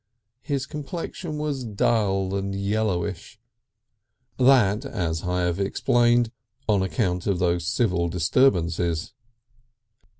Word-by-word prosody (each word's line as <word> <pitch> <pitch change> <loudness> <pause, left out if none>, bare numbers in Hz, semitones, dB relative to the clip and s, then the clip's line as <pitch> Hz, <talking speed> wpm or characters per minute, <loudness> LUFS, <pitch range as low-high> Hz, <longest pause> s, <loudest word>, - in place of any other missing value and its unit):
His 140 -2 -2
complexion 150 +2 -6
was 150 -3 -2
dull 100 -3 0
and 100 0 -2
yellowish. 100 0 -2 1.0
That, 125 -4 +4
as 85 - -2
I 90 0 0
have 90 +1 0
explained, 120 +4 +2 0.4
on 105 -3 +3
account 95 -2 -1
of 100 -3 +1
those 85 -2 0
civil 90 -7 +1
disturbances. 85 -4 +1
100 Hz, 100 wpm, -24 LUFS, 90-120 Hz, 1.0 s, That